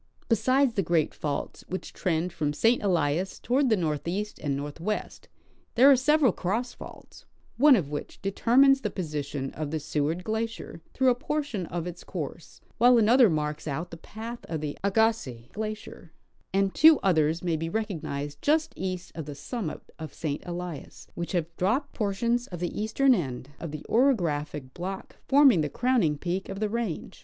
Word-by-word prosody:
Besides 255 +3 +3
the 200 - +1
great 165 -3 +1
faults 145 -2 -4
Avhich 185 - -5
trend 175 0 -1
from 145 -3 -1
St. 225 +10 +3
Elias 175 -1 0
toward 260 +3 +1
the 220 - +3
northeast 170 +5 -2
and 140 -2 -1
northwest, 165 +9 -4 0.5
there 265 +4 +8
are - - +8
several 280 0 +4
cross 225 +8 -2
faults, - - -13 0.3
one 285 +1 +7
of 155 - -1
which 145 - -6
determines 260 +7 +4
the 210 - -1
position 145 -7 -4
of 155 -1 -4
the 160 +1 -2
Seward 150 +4 -1
glacier 220 -5 -4
through 265 -1 +4
a - - +5
portion 260 - -3
of 175 -1 -4
its 175 0 -7
course, 165 -2 -7 0.2
while 245 +1 +7
another 235 +1 +6
marks 150 -1 -2
out 155 +4 -3
the - - -6
path 225 +7 -8
of 160 - -3
the 150 -1 -4
Agassiz 200 - +1
glacier; 215 -5 -6 0.4
and 195 0 +1
two 315 0 +7
others 160 -3 +2
may 170 -2 +1
be 165 +1 -3
recognized 150 -8 -4
just 310 +2 +2
east 185 -1 -4
of 160 - -6
the 145 - -6
summit 200 - -5 0.2
of 160 -1 -8
St. 150 -3 -3
Elias, 175 -4 -7
which 170 +2 -5
have 175 -3 +1
dropj^ed 250 +10 0
por 205 -3 -1
tions 240 +3 0
of 175 - -7
the 175 +3 -3
eastern 260 +5 +3
end 135 - -3
of 165 - -5
the 150 0 -7
orographic 155 - +1
block 190 +2 -6
forming 270 - +6
the 150 - -1
crowning 230 - +1
peak 180 +5 -3
of 195 0 -5
the 215 -1 0
range. 225 -6 -4
185 Hz, 175 wpm, -27 LUFS, 155-230 Hz, 0.5 s, there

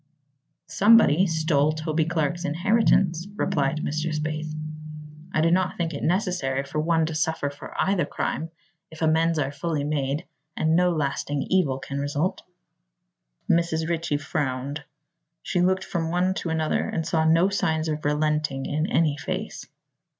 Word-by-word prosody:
"Somebody 190 -1 +5
stole 155 -2 +2
Toby 155 0 -1
Clark's 170 +1 -1
inheritance," 180 0 +2
replied 145 -4 0
Mr. 155 +2 -2
Spaythe. 155 0 -3 0.8
"I 155 - +1
do 165 +1 +3
not 185 +1 +1
think 165 -1 -2
it 140 - -5
necessary 175 -8 0
for 140 +2 -4
one 165 +1 +2
to 160 - -3
suffer 155 -2 -1
for 145 - -10
either 190 -5 +2
crime, 160 +2 -3 0.4
if 160 0 -7
amends 160 +1 +3
are 140 -2 0
fully 145 +1 -2
made 145 +1 -1 0.3
and 160 +1 +2
no 180 +1 +4
lasting 145 -3 -1
evil 170 -9 +2
can 140 +1 -5
result." 145 +5 -1 1.1
Mrs. 165 -1 +1
Ritchie 165 -3 -1
frowned. 145 -1 -3 0.6
She 180 - 0
looked 185 +1 +2
from 165 -2 -2
one 180 +2 +1
to 175 - -4
another 160 -1 0
and 165 - -2
saw 160 -2 +1
no 165 +4 +4
signs 160 -5 0
of 155 -1 -3
relenting 150 -2 0
in 155 +3 -1
any 155 -7 +2
face. - - -5
160 Hz, 150 wpm, -25 LUFS, 150-170 Hz, 1.1 s, Somebody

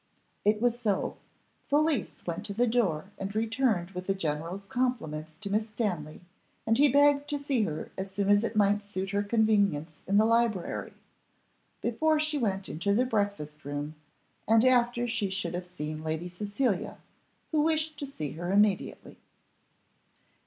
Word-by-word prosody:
It 210 +1 +3
was 240 +1 +1
so 210 -5 -1 0.5
Felicie 295 -5 +1
went 170 -1 -3
to 200 - -5
the 240 +3 +3
door 200 -7 0
and 195 +1 -4
returned 220 -5 +1
with 180 -1 -6
the 195 - +1
general's 170 +3 -3
compliments 180 -12 -2
to 200 +3 -6
Miss 215 +2 0
Stanley, 180 -9 -3 0.4
and 225 - +3
he 285 +2 +5
begged 285 +1 +4
to 295 - 0
see 280 -4 0
her 155 -3 -5
as 190 +1 -3
soon 195 +1 -1
as 205 +1 +5
it 230 - -2
might 205 0 +3
suit 195 -1 -4
her 200 0 +1
convenience 200 -8 +1
in 200 +2 +3
the 215 - +6
library, 230 -5 0 0.9
before 310 +7 +2
she 305 -1 0
went 195 -5 -1
into 200 +6 0
the 250 +4 +3
breakfast 200 -10 -2
room, 145 +2 -4 0.5
and 225 +2 +5
after 245 -1 +3
she 225 -4 0
should 185 -3 -2
have 180 0 -4
seen 155 -3 -5
Lady 160 +2 -2
Cecilia, 205 +3 -1 0.5
who 310 -2 +3
wished 310 -1 +1
to 285 - -4
see 155 - -5
her 175 +3 -4
immediately. 205 -1 +1
205 Hz, 160 wpm, -29 LUFS, 180-240 Hz, 0.9 s, the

